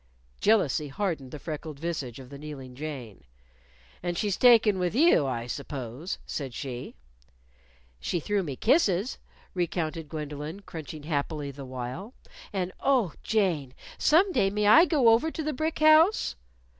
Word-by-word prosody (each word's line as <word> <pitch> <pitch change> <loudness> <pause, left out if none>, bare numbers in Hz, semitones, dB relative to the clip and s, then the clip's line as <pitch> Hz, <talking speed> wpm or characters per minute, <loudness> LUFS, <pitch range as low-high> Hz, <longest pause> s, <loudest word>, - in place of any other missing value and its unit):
Jealousy 175 -9 +2
hardened 155 -3 -3
the 150 - -7
freckled 155 0 -6
visage 150 -8 -4
of 130 0 -12
the 140 - -9
kneeling 140 -4 -8
Jane. 130 - -7 0.8
"And 175 -1 -2
she's 205 -1 0
taken 225 -5 +5
with 180 +2 -1
you, 280 - +5
I 120 -3 -2
suppose," 135 - -5
said 135 -5 -5
she. 125 -3 -6 1.0
"She 170 - -1
threw 205 +5 0
me 145 -7 -4
kisses," 220 - +2 0.3
recounted 165 -3 -2
Gwendolyn, 150 +3 -6
crunching 155 -5 -8
happily 145 -1 -2
the 140 0 -9
while. 130 - -6 0.4
"And, 185 -3 -2
oh, 250 - +2
Jane, 170 -12 0 0.2
some 365 +6 +4
day 195 - +2
may 210 +1 -1
I 315 +12 +8
go 280 -10 +4
over 230 +8 +4
to 320 - -5
the 305 0 -1
brick 315 +4 -2
house?" 310 +6 +5
165 Hz, 145 wpm, -27 LUFS, 140-210 Hz, 1.0 s, I